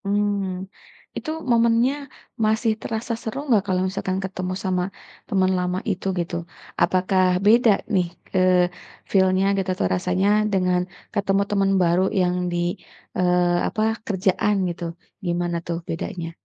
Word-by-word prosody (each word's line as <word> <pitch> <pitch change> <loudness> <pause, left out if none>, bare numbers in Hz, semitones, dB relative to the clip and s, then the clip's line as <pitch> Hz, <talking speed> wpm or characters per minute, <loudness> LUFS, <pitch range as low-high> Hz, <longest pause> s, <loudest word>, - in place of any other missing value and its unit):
Mmm. 200 -2 0 0.5
Itu - - -5 0.2
momennya 235 +2 +4 0.5
masih 220 +1 +2
terasa 230 +1 -3
seru 225 +4 -5
nggak 220 -7 +4
kalau 185 -1 +1
misalkan 190 -1 -2
ketemu 185 -1 -3
sama 185 -1 +1 0.5
temen 190 -3 +2
lama 180 0 -1
itu 190 0 -5
gitu? 170 0 -2 0.5
Apakah 185 +1 +2 0.2
beda 230 +2 +6 0.2
nih, 180 -2 +2 0.3
eee, 180 -1 +4 0.4
feel-nya 190 0 +3
gitu 190 -1 -1
atau - - 0
rasanya 180 +2 0 0.3
dengan 180 -1 +2 0.3
ketemu 200 -1 +1
temen 195 -1 +2
baru 175 +2 +3 0.2
yang 180 0 +1 0.2
di 175 - -1 0.6
eee, 180 -1 +3
apa, 215 - -2 0.3
kerjaan 200 +1 +1 0.2
gitu. 175 - -8 0.4
Gimana 175 0 -1
tuh 170 0 -1
bedanya? 165 0 -4
185 Hz, 130 wpm, -23 LUFS, 180-205 Hz, 0.6 s, beda